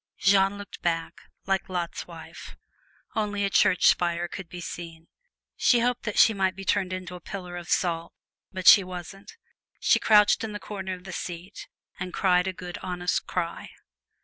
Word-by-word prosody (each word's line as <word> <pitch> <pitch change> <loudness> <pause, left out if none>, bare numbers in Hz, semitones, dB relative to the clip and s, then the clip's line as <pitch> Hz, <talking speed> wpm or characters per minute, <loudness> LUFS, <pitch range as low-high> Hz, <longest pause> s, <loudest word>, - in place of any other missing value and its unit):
Jeanne 195 0 +3
looked 205 0 -10
back, 165 -1 -2 0.2
like 195 0 -1
Lot's 175 -2 -4
wife: - - -11 0.6
only 205 -2 0
a 195 - -2
church 185 -1 +4
spire 175 0 +3
could 175 0 -8
be 180 - -8
seen. 165 -1 -8 0.5
She 240 -2 +3
hoped 245 0 0
that 210 - -3
she 225 - +7
might 190 -2 0
be 195 0 -8
turned 190 -2 +1
into 185 -1 -5
a 180 - -8
pillar 180 -1 -7
of 175 -1 -8
salt 170 -2 0 0.4
but 185 -1 -6
she 200 - +9
wasn't. 185 +3 -9 0.4
She - - +4
crouched 210 -1 +5
into 220 -1 -4
the 210 - -5
corner 190 -3 -5
of 180 - -15
the 190 - -8
seat 175 +3 -7 0.3
and 180 0 -5
cried 180 -1 +3
a - - 0
good 180 -1 -8
honest 180 -1 -2
cry. 170 -2 -3
185 Hz, 175 wpm, -26 LUFS, 175-200 Hz, 0.6 s, she